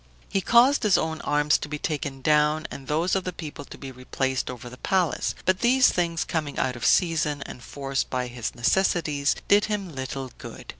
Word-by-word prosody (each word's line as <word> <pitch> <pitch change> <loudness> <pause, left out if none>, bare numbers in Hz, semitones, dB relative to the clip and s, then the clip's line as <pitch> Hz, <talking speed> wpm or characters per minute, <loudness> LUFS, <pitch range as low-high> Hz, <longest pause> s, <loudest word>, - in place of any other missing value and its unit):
He 195 - 0
caused 245 +7 +5
his 210 -3 +4
own 160 0 -2
arms 150 +1 +2
to 150 - -6
be 150 - -3
taken 145 -3 -3
down, 150 +1 +3
and 135 -1 -9
those 160 +4 0
of 190 - 0
the 180 - -3
people 150 -4 -8
to - - -11
be 135 -1 -8
replaced 130 +1 -2
over 125 -1 -7
the 125 +1 -11
palace; 185 -4 0
but 185 0 +2
these 255 +2 +5
things 170 -2 0
coming 155 -4 -3
out 130 -1 0
of 120 -5 -1
season, 160 -5 +2
and 125 - -9
forced 135 0 -3
by 125 -1 -1
his 120 -2 -5
necessities, 150 0 +1
did 205 0 +5
him 200 -5 -3
little 130 -1 -5
good. - - -9
150 Hz, 200 wpm, -25 LUFS, 135-180 Hz, -, caused